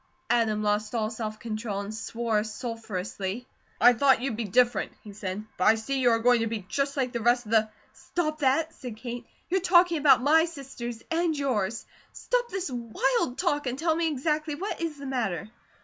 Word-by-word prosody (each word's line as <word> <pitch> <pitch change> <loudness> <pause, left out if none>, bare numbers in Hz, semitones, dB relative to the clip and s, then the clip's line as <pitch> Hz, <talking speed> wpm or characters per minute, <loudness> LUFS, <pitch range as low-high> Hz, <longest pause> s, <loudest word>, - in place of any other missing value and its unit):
Adam 220 -3 +2
lost 210 +2 0
all 220 -1 0
self 215 -1 -5
control 215 -3 -3
and 200 +2 -6
swore 220 -1 -1
sulphurously. 215 -1 -5 0.3
"I 245 +2 +7
thought 265 +2 +4
you'd 250 -2 -2
be 230 +1 -3
different," 240 +5 +2
he 210 - -10
said, 200 +1 -5
"but - - +1
I 220 - +7
see 265 +5 -2
you 250 -2 +4
are 230 - +4
going 245 +1 +4
to 225 - 0
be 215 -4 -4
just 275 +3 -1
like 255 -2 0
the 235 -2 -3
rest 240 +1 +3
of 215 - -9
the 220 -1 +4 0.2
!" - - -35
"Stop 310 -3 -3
that!" 305 +4 +2
said 245 -4 -8
Kate. 240 +1 -6 0.2
"You're 380 0 +2
talking 350 -2 +4
about 285 -3 +5
my 320 +3 +5
sisters 260 -7 -7
and 330 -1 +1
yours. 230 -6 -1 0.3
Stop - - -1
this 380 - -3
wild 245 +1 0
talk, 295 -6 0
and 250 +1 -2
tell 320 +1 +1
me 335 0 +1
exactly 305 +1 -1
what 375 +3 -4
is 325 -3 -3
the 280 - -8
matter." 220 - -2
245 Hz, 200 wpm, -27 LUFS, 220-290 Hz, 0.3 s, I